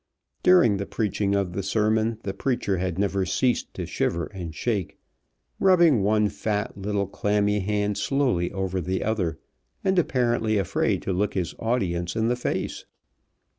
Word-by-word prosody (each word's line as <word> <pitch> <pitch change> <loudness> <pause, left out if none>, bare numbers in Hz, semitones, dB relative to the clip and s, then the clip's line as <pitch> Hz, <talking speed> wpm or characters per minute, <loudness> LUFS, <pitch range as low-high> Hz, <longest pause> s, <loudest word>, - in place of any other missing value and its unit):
During 175 - +5
the 100 - -4
preaching 100 -2 0
of 95 -3 -1
the 100 - -2
sermon 110 +3 +1
the 95 - -3
preacher 100 -4 -1
had 90 -2 -2
never 100 -1 +1
ceased 120 +7 0
to - - -4
shiver 85 0 -1
and 85 -4 -6
shake, 105 -5 -2 0.6
rubbing 170 - +5
one 105 +1 +3
fat 105 +1 -2
little 100 0 -1
clammy 105 +1 0
hand 105 +1 -1
slowly 130 -11 +1
over 95 -1 -2
the 95 +3 -2
other, 95 -7 -1 0.5
and 190 -2 +3
apparently 120 -7 +1
afraid 95 -4 0
to 95 - -1
look 100 +3 -1
his 90 -4 -1
audience 90 -7 -1
in 110 +1 +1
the 125 - +2
face. 125 - -3
105 Hz, 155 wpm, -25 LUFS, 95-115 Hz, 0.6 s, During